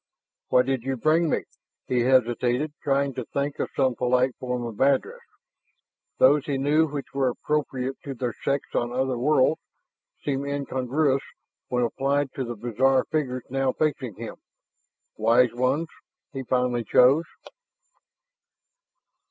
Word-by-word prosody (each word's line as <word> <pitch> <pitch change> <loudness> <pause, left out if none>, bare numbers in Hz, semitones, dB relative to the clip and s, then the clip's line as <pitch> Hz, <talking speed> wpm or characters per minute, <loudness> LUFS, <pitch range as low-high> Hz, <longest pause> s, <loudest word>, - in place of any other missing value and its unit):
"And - - -2
why 125 - +8
did 135 -1 -1
you 135 +2 -3
bring 160 +6 +2
me?" - - 0 0.4
He 125 - 0
hesitated, 125 +3 +2
trying 140 -1 +1
to 125 - -4
think 140 0 -2
of - - -1
some 130 -2 +2
polite 125 +1 +1
form 125 -1 -3
of 115 -3 -7
address. 140 - +2 1.0
Those 145 +2 +4
he 140 -2 0
knew 150 +4 +3
which 140 -2 -6
were 135 -2 +1
appropriate 135 -1 -2
to 140 -2 -5
their 120 -1 -3
sex 140 0 0
on 120 0 0
other 130 +1 0
worlds 150 +2 +3 0.6
seemed 140 -1 -1
incongruous 140 0 0 0.5
when 125 -1 0
applied 135 +3 0
to 135 - -3
the 120 -1 -5
bizarre 130 +4 +1
figures 130 -5 -1
now 135 -1 +1
facing 135 -8 -1
him. - - -8 0.8
"Wise 115 +2 +4
ones," 130 +7 0 0.4
he 135 - -4
finally 125 -1 0
chose. 130 +8 +4
130 Hz, 140 wpm, -25 LUFS, 125-140 Hz, 1.0 s, why